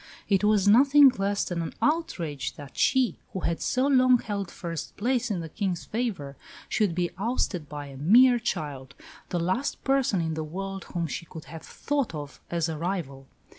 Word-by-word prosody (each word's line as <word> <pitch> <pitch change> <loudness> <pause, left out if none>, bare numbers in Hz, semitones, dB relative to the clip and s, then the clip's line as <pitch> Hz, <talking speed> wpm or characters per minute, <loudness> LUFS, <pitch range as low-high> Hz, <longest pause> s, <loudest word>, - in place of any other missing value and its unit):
It 195 -1 +2
was 210 -2 +3
nothing 275 +6 +7
less 200 +1 +1
than 175 -2 -3
an 165 - -5
outrage 175 - -1
that 145 -2 -11
she, 260 -3 +2
who 190 - -3
had 170 0 -1
so 255 +1 +1
long 255 -2 +5
held 200 -5 -4
first 165 -3 -6
place 245 +2 0
in 190 -5 -1
the 165 - -7
King's 185 -1 -3
favour, 200 - -3 0.3
should 200 -6 +1
be 175 -1 0
ousted 200 - -1
by 145 -1 -6
a 135 -1 -10
"mere 240 - +6
child," 140 - -4 0.3
the 175 - -1
last 185 - -1
person 270 -8 +2
in 160 -1 -1
the 155 0 -3
world 195 +4 -5
whom 170 -1 -3
she 165 +2 -5
could 160 -1 -10
have 165 - -7
thought 280 - -2
of 145 -1 -8
as 170 -1 0
a 160 -2 -4
rival. 155 -7 -4
185 Hz, 185 wpm, -27 LUFS, 160-240 Hz, 0.3 s, nothing